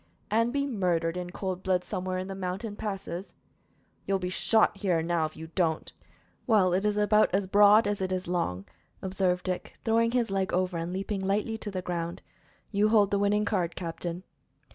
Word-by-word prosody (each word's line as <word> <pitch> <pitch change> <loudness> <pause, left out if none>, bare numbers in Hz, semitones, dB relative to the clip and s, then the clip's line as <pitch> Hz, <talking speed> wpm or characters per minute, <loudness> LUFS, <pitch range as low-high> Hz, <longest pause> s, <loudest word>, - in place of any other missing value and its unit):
"And 230 +2 +2
be 280 +1 0
murdered 180 -9 0
in 180 -1 -4
cold 185 0 -4
blood 185 -1 +1
somewhere 185 0 -3
in 185 0 -3
the 195 - -5
mountain 195 +3 -4
passes?" 195 -3 -5 0.8
"You 195 - +2
will - - 0
be 180 -1 -3
shot 215 +2 +3
here 185 -4 +1
and 165 0 -2
now 170 -2 +1
if 155 - -7
you 160 +1 -9
don't." 165 -4 0 0.5
"Well, 200 -6 +4
it 190 +3 +1
is 210 0 +1
about 210 +1 +4
as 195 0 +1
broad 205 +3 +6
as 205 -1 -1
it 185 0 -1
is 185 -1 -2
long," 135 - -1 0.4
observed 185 -1 0
Dick, 185 -1 -3
throwing 230 0 +3
his 240 -5 +1
leg 195 -1 0
over 180 0 0
and 165 +1 -3
leaping 195 +1 -3
lightly 205 +4 0
to 210 - -5
the 185 -2 -4
ground. 170 -1 -4 0.5
"You 210 +1 +3
hold 210 -3 +4
the 200 - +2
winning 205 +1 +2
card, 180 -5 -1
captain." 175 0 -5
190 Hz, 200 wpm, -28 LUFS, 180-205 Hz, 0.8 s, broad